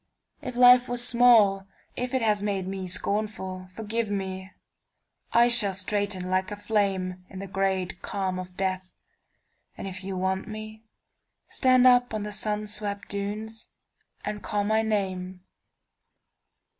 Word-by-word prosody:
If 250 - -6
life 250 0 +7
was 245 0 +3
small, 220 -6 +5 0.3
if 250 +1 -3
it 255 - +1
has 210 -2 +2
made 200 -3 -2
me 190 -1 -4
scornful, 190 -1 -2
Forgive 220 +2 -3
me; 190 -1 -4 0.8
I 235 +1 +5
shall 215 -5 +3
straighten 195 -1 -1
like 185 0 +1
a 205 - -5
flameIn 200 -3 -1 0.2
the 195 - -5
great 190 -2 -2
calm 190 -2 -3
of 180 0 -9
death, 190 -1 -2 0.9
and - - -6
if 185 -1 -7
you 190 0 -4
want 190 +1 -1
meStand 245 +3 0
on 215 -1 -3
the 210 - -5
sun 210 0 -1
swept 205 -1 -4
dunes 210 +2 -4 0.6
and 210 -1 -4
call 205 -1 -1
my 220 +2 +2
name. 190 -4 -2
205 Hz, 130 wpm, -26 LUFS, 190-220 Hz, 0.9 s, life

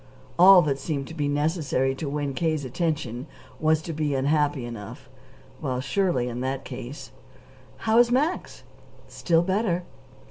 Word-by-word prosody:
All 185 0 +9
that 140 -2 -1
seemed 140 -1 -3
to - - -8
be 150 -3 -1
necessary 145 -2 0
to 140 +2 -5
win 145 -1 -2
K.'s 155 0 -1
attention 130 -3 -2 0.3
was 155 0 +2
to 165 - -5
be 150 -2 -1
unhappy 145 -1 +1
enough. 115 -4 -9 0.5
Well, 130 -1 -2
surely, 135 -2 0
in 120 0 -4
that 135 +1 -3
case 130 0 -8 0.7
"How 225 +1 +4
is 240 0 +5
Max?" 290 +8 -1 0.4
"Still 165 -1 +1
better." 185 -1 0
150 Hz, 145 wpm, -25 LUFS, 135-170 Hz, 0.7 s, All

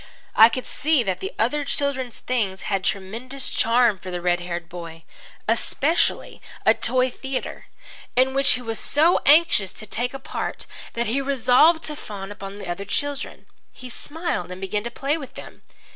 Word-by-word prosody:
I 225 +1 +9
could 255 +2 -4
see 300 -3 +1
that 190 -4 -1
the 190 - -4
other 270 +7 +1
children's 270 -4 -2
things 210 -7 -2
had 195 -2 -1
tremendous 230 +9 -2
charm 230 -3 +3
for 185 - -8
the 180 -1 -3
red 175 0 +1
haired 175 -1 -5
boy, 165 -2 -9 0.4
especially 275 +8 0 0.2
a - - +7
toy 255 0 +1
theatre, 265 +1 -5 0.5
in 260 +1 +4
which 275 +1 +4
he 250 - -3
was 225 -1 -3
so 320 +5 +4
anxious 290 - +5
to 215 - -8
take 245 +5 -2
a - - -2
part 265 - -4 0.3
that 235 0 -1
he 250 +5 0
resolved 275 +4 +4
to 305 - -4
fawn 200 -7 -7
upon 200 -1 -8
the 200 - -7
other 175 +3 -3
children. 285 +7 -3 0.3
He 255 - -10
smiled 310 - -4
and 180 - -7
began 195 +2 -2
to - - -1
play 275 +6 -1
with 270 -4 -10
them. - - -11
235 Hz, 175 wpm, -23 LUFS, 195-275 Hz, 0.5 s, I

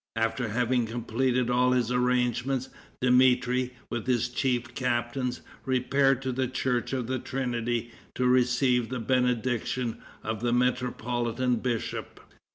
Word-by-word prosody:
After 115 +2 0
having 120 +1 +1
completed 120 +2 0
all 125 +1 +3
his 125 -2 +1
arrangements, 125 +1 +1 0.3
Dmitri, 125 0 +3 0.2
with 120 +1 -3
his 120 -2 +1
chief 120 -1 -1
captains, 125 0 -1 0.2
repaired 135 +1 +2
to 130 - -1
the 130 +1 0
church 125 -1 -1
of 130 -3 -1
the 130 +2 -2
Trinity 120 -3 -2 0.2
to 125 - 0
receive 125 -1 +3
the 130 -1 -3
benediction 125 0 0 0.2
of 110 -1 -3
the 120 0 +1
metropolitan 125 0 0
bishop. 120 -1 -3
125 Hz, 125 wpm, -28 LUFS, 120-130 Hz, 0.3 s, all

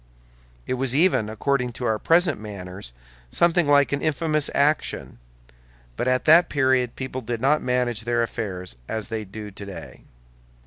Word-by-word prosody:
It - - -2
was 135 -1 0
even, 135 - +3
according 125 +2 -1
to 125 - -5
our 110 -2 0
present 165 - +2
manners, 95 - -8 0.4
something 170 - +2
like 145 -1 +4
an 140 - -1
infamous 155 -1 +1
action; 145 - 0 0.8
but 120 - -2
at 130 0 +1
that 170 +3 +6
period 130 -3 +1
people 130 0 -5
did 120 -1 -4
not 145 +5 +2
manage 125 -2 0
affairs 110 - -2
as 110 -1 -3
they 110 -2 -4
do 105 +2 -8
today. 100 -4 -10
125 Hz, 145 wpm, -24 LUFS, 110-145 Hz, 0.8 s, that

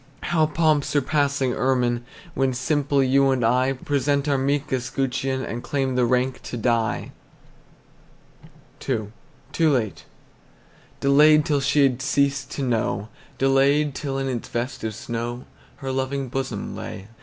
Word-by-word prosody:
How 155 -1 +2
pomp 155 -2 +2
surpassing 140 -2 +1
ermine, 125 -2 +1 0.3
When 135 -3 0
simple 140 +1 +1
you 135 +1 +3
and 130 -3 +1
I 130 +3 +2
Present 140 +1 0
our 140 - +2
meek 140 +1 0
escutcheon, 130 +1 -1
And 120 - -5
claim 135 -1 -1
the 125 -1 +2
rank 125 +1 0
to 120 - -6
die! 115 0 0 1.8
II. 110 -5 -1 0.4
TOO 165 -1 +3
LATE. 105 - -1 1.0
Delayed 150 +2 +5
till 145 -4 +1
she 140 +2 +3
had 130 -2 +2
ceased 140 0 +1
to 140 - -3
know, 115 -4 -1 0.3
Delayed 140 +2 +3
till 135 -1 -3
in 135 0 -2
its 125 -3 -4
vest 120 +3 -3
of 110 -2 -3
snow 120 +2 -5 0.3
Her 135 -1 -5
loving 135 0 -2
bosom 130 -5 -4
lay. 95 +1 -7
135 Hz, 140 wpm, -23 LUFS, 125-140 Hz, 1.8 s, Delayed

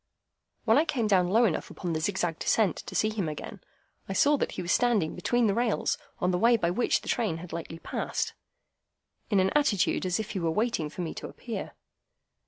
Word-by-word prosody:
When 225 +4 +5
I 315 - +3
came 265 -8 0
down 185 -4 +3
low 225 +5 +4
enough 175 -8 -1
upon 175 -3 -4
the 160 - -1
zigzag 175 -2 -1
descent 215 -5 +2
to - - -8
see 215 - +2
him 205 -7 -2
again, 180 +6 -7 0.5
I - - -1
saw 285 +9 +4
that - - -2
he - - -4
was 175 - -1
standing 230 -10 +2
between 240 +7 +1
the 205 - +3
rails 235 0 0 0.2
on 180 - +1
the 180 - 0
way 235 +3 +5
by 170 -5 0
which 235 +7 +1
the - - -12
train 215 -9 0
had 170 +1 -9
lately 165 0 -5
passed, - - -3 1.0
in 205 -4 +3
an 190 +1 +2
attitude 235 -11 +2
as 180 +3 0
if 215 - -4
he 195 - -2
were 165 -2 0
waiting 210 -4 0
for 170 - -6
me 165 - -3
to - - -6
appear. - - -6
195 Hz, 215 wpm, -28 LUFS, 175-230 Hz, 1.0 s, When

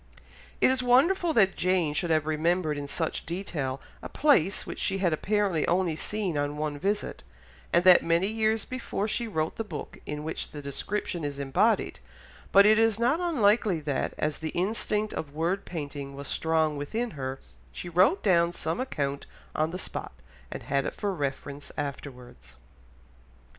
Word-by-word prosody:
It - - +6
is 260 -1 +1
wonderful 325 +9 +4
that 195 -6 +4
Jane 180 -4 +1
should 170 +3 -1
have 155 -2 +2
remembered 155 +1 +1
in 145 0 -5
such 160 +2 -2
detail 155 -7 -3 0.2
a - - -7
place 210 - +3
which - - -7
she 195 - 0
had 185 -4 +1
apparently 195 -1 +1
only 175 -2 +1
seen 185 -2 -2
on 145 +1 -2
one 150 -1 -3
visit, 205 +5 -2 0.5
and 170 - +4
that 185 -1 +8
many 170 +2 +2
years 220 0 0
before 235 -5 -3
she 235 +2 -1
wrote 160 -6 -2
the 225 - -1
book 160 -9 -7
in 150 0 -4
which 160 - -4
the 150 - -8
description 170 +5 -3
is 145 -1 -3
embodied, 140 +11 +1 0.5
but 200 +1 +7
it 215 +1 +6
is 225 -2 +3
not 245 +8 +2
unlikely 220 - +2
that, 145 -2 -2
as 150 -1 -1
the 160 - -3
instinct 210 +2 0
of 145 -2 -5
word 175 +5 -1
painting 145 -4 -6
was 140 0 -6
strong 160 -2 +1
within 225 +12 -3
her, 135 -3 -5 0.3
she 175 - -7
wrote 185 - +3
down 170 -4 +4
some 165 0 -2
such 260 - -2
account 140 - -3 0.3
on 155 +1 +1
the 180 - -5
spot, 185 - -6 0.4
and - - -7
had 140 0 0
it - - -4
for 205 -2 -2
reference 140 -2 -4
afterwards. 125 - -7
170 Hz, 175 wpm, -28 LUFS, 145-210 Hz, 0.5 s, that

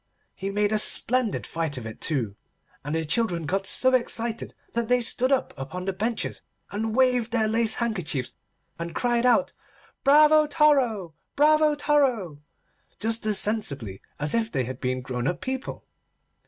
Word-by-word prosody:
He 195 - -5
made 205 +1 0
a 215 - +2
splendid 240 0 +1
fight 160 -4 -3
of 120 - -6
it 110 - -9
too, 120 -10 -1 0.5
and 145 +3 -3
the 160 0 -1
children 170 -1 0
got 195 +5 -1
so 260 0 +3
excited 235 -2 -1 0.2
that 235 -1 -1
they 250 +1 +3
stood 245 +2 +1
up 270 - +1
upon 180 +8 -6
the 195 - -1
benches, 220 +4 -3 0.3
and 220 +2 -2
waved 250 -3 +2
their 225 -2 +2
lace 225 0 +1
handkerchiefs 180 - -2 0.5
and 170 0 -5
cried 240 0 +1
out: 260 +3 +3 0.5
Bravo 300 +2 +6
toro! 265 - +2 0.2
Bravo 305 +1 +4
toro! 255 - +1 0.6
just 225 0 0
as 210 -2 +2
sensibly 140 - -1 0.2
as 150 0 +1
if 225 -1 0
they 130 -3 0
had 130 +1 -7
been 130 0 -1
grown 125 0 -3
up 170 +4 -1
people. 260 0 -5
220 Hz, 160 wpm, -25 LUFS, 160-250 Hz, 0.6 s, Bravo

